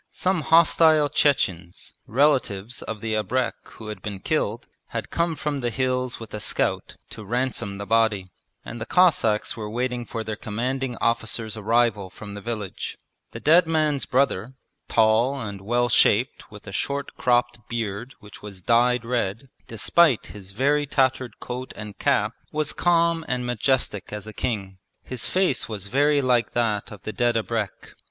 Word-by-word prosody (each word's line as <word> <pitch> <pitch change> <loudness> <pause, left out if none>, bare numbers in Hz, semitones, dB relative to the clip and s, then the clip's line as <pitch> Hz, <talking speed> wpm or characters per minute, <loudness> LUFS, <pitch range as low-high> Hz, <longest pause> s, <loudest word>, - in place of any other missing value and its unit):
Some 185 -2 0
hostile 160 -1 +5
Chechens, 95 - 0
relatives 125 -5 +1
of 110 -2 -6
the 110 -1 -2
abrek 125 +4 0 0.2
who 110 -1 -9
had 105 -3 -7
been 100 -1 -5
killed, 120 -2 -1 0.2
had - - -5
come 170 -1 0
from 150 -2 -2
the 120 -2 -1
hills 130 0 -1
with 115 -2 -10
a 105 - -3
scout - - -1 0.2
to 110 - -8
ransom 120 -3 -2
the 100 - -5
body; 110 -4 +1 0.3
and 120 - -7
the 110 - -4
Cossacks 145 -13 +3
were 110 -2 -5
waiting 125 +1 -2
for 115 -2 -4
their 110 -1 -4
Commanding 125 +4 -3
Officer's 110 -1 -1
arrival 110 -2 +1
from 100 +2 -9
the 100 - -7
village. 105 -3 -5 0.3
The - - -8
dead 165 +3 +5
man's 155 -4 +1
brother, 130 -2 +1 0.3
tall 115 +5 +3
and 100 -4 -6
well 120 +4 +1
shaped 120 +2 +2
with 105 -1 -13
a 100 - -8
short 140 +7 -2
cropped 120 -1 +1
beard 115 +2 -4
which 105 -1 -13
was 100 -3 -10
dyed 120 +2 +3
red, 115 0 -2 0.2
despite 135 +4 +3
his 100 -2 -10
very 140 +8 +1
tattered 130 -2 0
coat 125 +1 -6
and 105 -1 -8
cap 105 +2 +2 0.2
was 155 0 -1
calm 170 -1 +2
and 125 0 -1
majestic 120 -4 0
as 105 -1 -5
a 110 - -8
king. 100 -5 -3 0.2
His 125 -2 -3
face 185 -11 +1
was 105 -3 -5
very 145 +5 +2
like 120 -3 +2
that 110 -4 0
of 105 -3 -11
the 110 - -5
dead 120 -1 +1
abrek. 110 -3 -3
120 Hz, 165 wpm, -24 LUFS, 105-135 Hz, 0.3 s, hostile